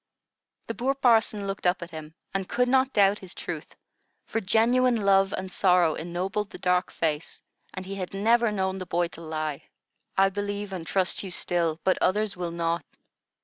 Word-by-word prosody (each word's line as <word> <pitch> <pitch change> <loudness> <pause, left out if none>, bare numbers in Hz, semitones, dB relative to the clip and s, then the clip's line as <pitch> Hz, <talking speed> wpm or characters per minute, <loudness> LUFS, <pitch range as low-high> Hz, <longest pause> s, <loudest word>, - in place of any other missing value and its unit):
The - - -4
poor 265 +3 0
parson 225 -5 +3
looked 195 -2 -2
up 180 0 +1
at 170 - -10
him, 155 0 -9 0.2
and 195 -1 -2
could 250 +1 +2
not 265 +1 +3
doubt 200 -2 +4
his 190 -2 -9
truth; - - -6 0.5
for 225 - -2
genuine 240 +5 +3
love 195 -2 +3
and 185 -1 -4
sorrow 180 -4 +3
ennobled 185 +5 -3
the - - -9
dark 180 -1 +1
face, 155 -1 -2 0.3
and 185 - -5
he 195 - -6
had 185 -2 -5
never 225 +3 +3
known 190 -2 -1
the 185 - -6
boy 175 0 0
to 170 - -11
lie. 155 -2 -3 0.6
"I 195 0 +5
believe 205 0 -4
and 170 -3 -6
trust 190 -1 +1
you 195 - -6
still, 170 -2 0
but 185 - +2
others 210 +2 +1
will 180 -1 -3
not. 170 0 -1
190 Hz, 185 wpm, -26 LUFS, 175-210 Hz, 0.6 s, I